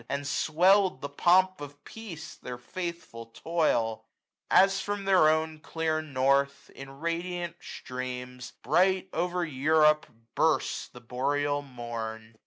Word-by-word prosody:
And 140 0 -2
sweird 180 +2 +3
the 140 - -4
pomp 185 +4 +3
of 145 0 -10
peace 220 -8 -9
their 125 -1 -8
faithful 170 -6 -7
toih 115 -4 0 0.5
905 190 - +7
As 195 0 -2
from 205 0 -3
theif 185 -5 +5
own 160 0 -1
clear 160 0 -2
north, 140 -1 0
in 135 0 -10
radiant 170 +1 -3
streams, 125 0 -7
Bright 185 +7 +2
over 175 +1 -1
Europe 150 +1 +3 0.3
bursts - - +1
the - - -14
Boreal 145 +4 -1
Morn. 115 -4 -7
155 Hz, 125 wpm, -28 LUFS, 130-175 Hz, 0.5 s, 905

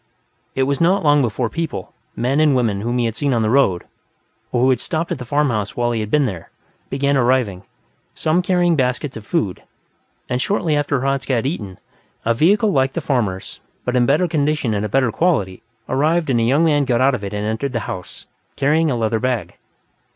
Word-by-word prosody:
It 135 - +2
was 140 +2 0
not 185 +3 +3
long 145 -1 +4
before 120 0 -1
people, 160 - -5 0.2
men 130 +4 0
and 150 -3 +4
women 110 -6 0
whom 120 +3 -1
he 120 - +1
had 115 -1 -2
seen 140 -2 0
on 115 - +1
the 110 - +1
road 110 -10 +3 0.7
or 120 - +1
who 130 - +4
had 125 - +1
stopped 165 +4 -2
at 165 - -2
the 125 - -6
farmhouse 120 -7 0
while 120 0 +1
he 115 - -1
had 105 -1 -3
been 145 +3 +3
there, 90 -8 -5 0.4
began 140 +1 +1
arriving, 120 -7 +1 0.5
some 160 +3 +1
carrying 175 -2 +2
baskets 130 0 -1
of 110 -1 -9
food; 150 - -1 0.7
and 125 +1 -1
shortly 170 -5 0
after 145 -2 0
Hradzka 135 0 -1
had 115 - -1
eaten, 105 - -4 0.5
a 115 - +3
vehicle 205 - +3
like 135 -3 +1
the - - -2
farmer's, 105 -9 -2 0.3
but 125 - -1
in 120 -1 +3
better 155 +6 +3
condition 150 -6 0
and 105 0 -1
of 105 - -2
better 130 0 +2
quality, 105 - 0 0.3
arrived 155 +2 +1
and 120 - +2
a - - +1
young 140 +8 +3
man 145 -3 +3
got 120 -2 +1
out 135 +2 +4
of 115 -5 -3
it 100 - -4
and 105 0 -3
entered 110 +5 -2
the 115 - -1
house, 90 -3 -7 0.3
carrying 155 +3 +2
a 130 - 0
leather 110 -1 0
bag. 125 -2 -2
130 Hz, 210 wpm, -20 LUFS, 115-150 Hz, 0.7 s, long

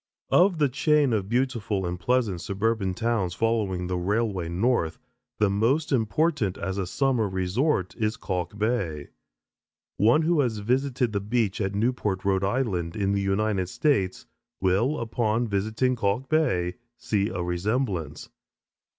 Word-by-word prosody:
Of 180 -1 +5
the 150 -2 +3
chain 145 0 +2
of 100 -3 -1
beautiful 115 -6 0
and 90 0 -3
pleasant 115 -6 0
suburban 100 -1 -1
towns 110 -5 -1
following 105 -5 0
the 90 0 -2
railway 100 -2 -1
north, 90 -3 0 0.4
the 105 - +3
most 115 +10 +1
important 125 - +1
as 95 0 -3
a 95 - -2
summer 125 -1 +1
resort, 95 - 0
is 110 -1 -1
Kalk 90 0 -3
Bay. 100 -10 -1 0.9
One 120 +9 +4
who 165 0 +2
has 120 -6 +1
visited 125 +2 0
the 100 - +1
beach 105 0 -1
at 95 0 -1
Newport, 105 -4 -1
R. 95 -1 +2
I., 105 +7 +1
in 95 -3 -1
the 100 0 +1
United 100 -1 0
States, 100 -11 0 0.3
will, 100 +11 +1
upon 115 0 0
visiting 110 +5 0
Kalk 110 +4 -1
Bay, 105 - +1 0.2
see 105 -4 0
a 90 -1 -3
resemblance. 90 - -2
105 Hz, 140 wpm, -26 LUFS, 95-125 Hz, 0.9 s, Of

